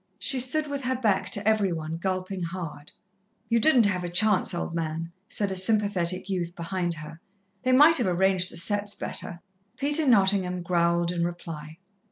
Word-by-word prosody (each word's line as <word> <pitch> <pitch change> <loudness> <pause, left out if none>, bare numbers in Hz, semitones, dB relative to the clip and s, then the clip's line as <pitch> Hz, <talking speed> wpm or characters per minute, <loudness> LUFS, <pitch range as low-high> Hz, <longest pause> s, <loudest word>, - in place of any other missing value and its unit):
She 265 - +1
stood 280 +5 +1
with 285 -1 -5
her 260 +1 0
back 220 -6 0
to 205 +1 -1
every 215 -4 +2
one, 160 -1 -4
gulping 185 +1 -3
hard. 165 -4 -6 0.6
"You 230 0 +3
didn't 250 -3 +4
have 185 -3 -1
a 175 - -4
chance, 205 +3 +3
old 170 -1 -4
man," 165 0 -4 0.2
said 200 -2 -1
a - - -3
sympathetic 185 -2 +1
youth 175 -3 -3
behind 175 0 -3
her. 155 +1 -10 0.4
"They 255 - 0
might 295 +6 +6
have 240 - +1
arranged 185 0 +1
the - - -6
setts 205 +4 +1
better." 170 0 -3 0.4
Peter 295 +2 +1
Nottingham 190 -5 +2
growled 170 0 +1
in 170 -1 -2
reply. 165 -3 -6
185 Hz, 175 wpm, -26 LUFS, 170-210 Hz, 0.6 s, might